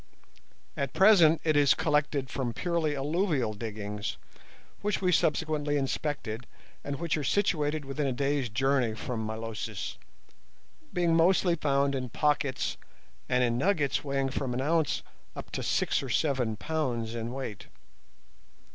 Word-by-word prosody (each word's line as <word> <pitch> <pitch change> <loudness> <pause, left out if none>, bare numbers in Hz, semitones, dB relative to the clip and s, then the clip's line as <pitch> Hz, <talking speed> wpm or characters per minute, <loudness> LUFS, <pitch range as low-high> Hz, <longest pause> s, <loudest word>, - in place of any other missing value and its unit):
At 140 -2 -2
present 170 -3 +6
it 155 -2 +2
is 145 -2 +5
collected 150 -3 +1
from 130 -3 -3
purely 170 -4 0
alluvial 145 - 0
diggings, 105 -1 -5 0.6
which 210 0 0
we 185 -1 +2
subsequently 150 -2 +1
inspected, 135 -4 -3 0.4
and 145 - -3
which 165 +2 -1
are 150 - -2
situated 155 -5 +1
within 135 +1 -2
a - - +1
day's 140 0 0
journey 125 0 +1
from 115 0 -4
Milosis, 110 -1 -5 0.9
being 170 -2 +2
mostly 175 +1 +4
found 140 -2 +1
in 130 -2 -3
pockets 145 0 0 0.5
and 125 0 +3
in 120 0 +1
nuggets 155 -4 +1
weighing 135 -1 0
from 130 -2 -2
an 130 - -1
ounce 155 0 +1 0.3
up - - -8
to - - -3
six - - +1
or 135 - -6
seven 125 -4 +1
pounds 120 -5 -2
in 115 0 -4
weight. 130 -6 -6
140 Hz, 140 wpm, -29 LUFS, 125-155 Hz, 0.9 s, present